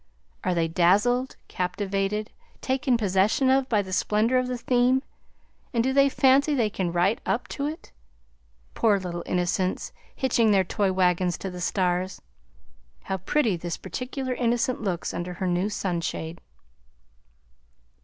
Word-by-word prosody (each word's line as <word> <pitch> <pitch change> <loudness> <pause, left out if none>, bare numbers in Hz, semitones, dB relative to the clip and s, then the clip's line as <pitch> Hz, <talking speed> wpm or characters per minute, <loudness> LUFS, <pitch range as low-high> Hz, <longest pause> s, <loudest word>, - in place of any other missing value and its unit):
"Are 180 -1 0
they 165 -1 +1
dazzled, 205 +10 +2
captivated, 195 +3 -2 0.3
taken 260 -1 +1
possession 210 +5 +2
of, 270 0 +2
by 210 -3 +2
the 190 -1 -7
splendor 220 +6 +2
of 255 - -1
the 250 0 -3
theme, 250 +2 +2 0.7
and 230 - +3
do 265 +1 +1
they 275 0 +5
fancy 275 +3 +3
they 225 -5 +1
can 185 -3 -2
write 175 +5 +1
up 245 - -1
to 285 0 -3
it? 310 +2 -7 0.8
Poor 215 -3 +3
little 175 -2 -5
innocents, 180 +1 -1 0.2
hitching 235 -4 +2
their 195 -2 +4
toy 195 +1 0
wagons 180 -1 +1
to 190 - -5
the 180 0 -7
stars! 180 0 0 0.8
How 190 - -2
pretty 215 +3 +1
this 170 0 -4
particular 260 0 -4
innocent 240 0 0
looks 185 -5 -2
under 180 +1 -4
her 185 - -3
new 180 +3 0
sunshade!" 170 -4 -3
205 Hz, 145 wpm, -26 LUFS, 180-250 Hz, 0.8 s, they